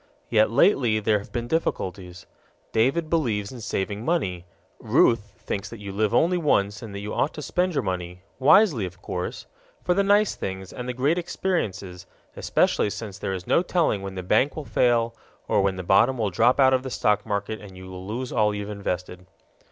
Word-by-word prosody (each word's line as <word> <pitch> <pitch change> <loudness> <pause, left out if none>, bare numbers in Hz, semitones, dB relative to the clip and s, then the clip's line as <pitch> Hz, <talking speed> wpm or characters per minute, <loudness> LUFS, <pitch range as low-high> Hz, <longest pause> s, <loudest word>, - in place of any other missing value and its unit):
Yet 110 0 +4
lately 120 - +3
there 105 0 +2
have 100 - -12
been 120 -1 -3
difficulties. 90 - -3 0.5
David 135 +9 +1
believes 115 -12 0
in 125 -3 -9
saving 100 +1 -3
money; 95 - -1 0.3
Ruth 105 -4 +2
thinks 100 0 -3
that 115 - -9
you 100 -1 -7
live 105 +1 0
only 170 +9 +3
once 105 - +1
and 105 -3 -8
that 100 - -5
you 105 +1 -5
ought 150 - 0
to - - -6
spend 180 +5 0
your - - +1
money 90 -1 -4 0.2
wisely, 140 - +5
of 90 0 -13
course 90 -2 -5 0.4
for 180 - +2
the 200 - +2
nice 205 +1 +3
things 95 -1 -6
and 125 0 -6
the - - -2
great 145 +7 +1
experiences, 100 - -3 0.3
especially - - +1
since 100 -2 -7
there 95 - -3
is 90 -2 -5
no - - +3
telling 170 - +1
when 95 -1 -6
the 95 - -5
bank 135 +10 +2
will 155 - -6
fail 120 -3 +2 0.3
or 100 - +2
when 95 -1 +1
the 95 - -5
bottom 115 +9 +4
will 110 -4 -1
drop 120 +9 +3
out 130 -1 +6
of 130 - +2
the 130 - -6
stock 105 -4 +1
market 105 0 -3
and 95 -3 -12
you 95 - -10
will 95 0 -9
lose 125 +4 -4
all 105 -1 +2
you've 105 0 -5
invested. 90 -2 -5
105 Hz, 200 wpm, -25 LUFS, 95-130 Hz, 0.5 s, out